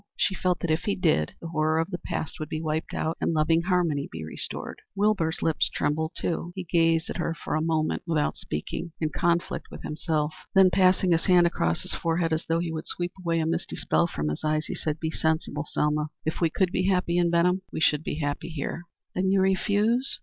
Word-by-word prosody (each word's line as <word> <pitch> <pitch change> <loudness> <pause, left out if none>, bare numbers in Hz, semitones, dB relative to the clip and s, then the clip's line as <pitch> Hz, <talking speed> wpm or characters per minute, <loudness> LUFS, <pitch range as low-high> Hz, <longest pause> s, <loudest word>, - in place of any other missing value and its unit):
She 195 - +2
felt 180 -2 0
that 170 - 0
if 160 +2 0
he 205 - +1
did, 155 - +1
the 165 - -7
horror 155 -1 +1
of 165 +4 0
the 175 - -3
past 155 - -4
would 155 -1 -4
be 155 - -2
wiped 155 0 -2
out 160 +1 -2
and - - +1
loving 160 +2 +3
harmony 170 -5 +1
be 80 0 -6
restored. 80 - -4
Wilbur's 195 -6 +1
lips 160 - +2
trembled, 160 +2 -1
too. 175 +1 -2
He 190 - -4
gazed 165 -1 +2
at - - -4
her 165 -1 -1
for - - -5
a 155 - +1
moment 160 -1 0
without 155 -3 +1
speaking, 155 - -5
in 155 - 0
conflict 170 +2 0
with - - -10
himself; 155 -1 -1 0.2
then 190 -1 +7
passing 185 -1 +4
his 165 -1 +2
hand 180 -2 +6
across 85 - 0
his - - -4
forehead, 165 -1 0
as 160 - -1
though 165 - +2
he 170 0 -1
would 160 0 -5
sweep 175 0 -2
away 165 -1 +1
a - - 0
misty 165 +2 -2
spell 170 - +2
from 75 - -2
his 75 - -4
eyes, 155 0 0
said, 155 0 -3
"Be 160 -1 -2
sensible, 160 -2 -1
Selma. 150 0 0 0.2
If 160 - -2
we 165 - +4
could 185 +2 +1
be 185 0 +1
happy 180 -2 +2
in 175 -1 +3
Benham, 180 +2 +3
we - - -3
should 150 -2 +3
be - - -3
happy 150 +1 -3
here." 160 +1 -4 0.3
"Then 190 +1 +1
you 195 0 +4
refuse?" 205 +6 +2
165 Hz, 225 wpm, -27 LUFS, 155-180 Hz, 0.3 s, then